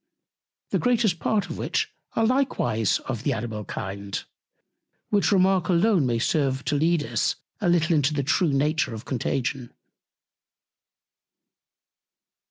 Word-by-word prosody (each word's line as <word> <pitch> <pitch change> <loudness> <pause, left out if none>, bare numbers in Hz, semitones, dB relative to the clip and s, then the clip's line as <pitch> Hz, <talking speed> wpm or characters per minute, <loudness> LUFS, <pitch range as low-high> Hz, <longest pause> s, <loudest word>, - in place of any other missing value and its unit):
the - - +1
greatest 230 -8 +2
Part 210 +3 0
of - - -6
which - - -1 0.2
are 225 - +2
likewise 170 - +1
of 120 -5 -3
the 140 +3 0
Animal 110 -2 -4
Kind; 100 +1 -5 0.9
which 205 0 +3
Remark 190 -2 +3
alone 180 - +3
may 120 -1 +1
serve 135 +1 0
to 150 - 0
lead 160 +1 +2
Us 115 -1 0 0.2
a 195 -5 +1
little 170 -1 +3
into 145 -1 +2
the 145 -2 -1
true 150 +4 +2
Nature 145 -3 +1
of 110 - -9
Contagion. 125 0 -2
150 Hz, 130 wpm, -25 LUFS, 120-185 Hz, 0.9 s, which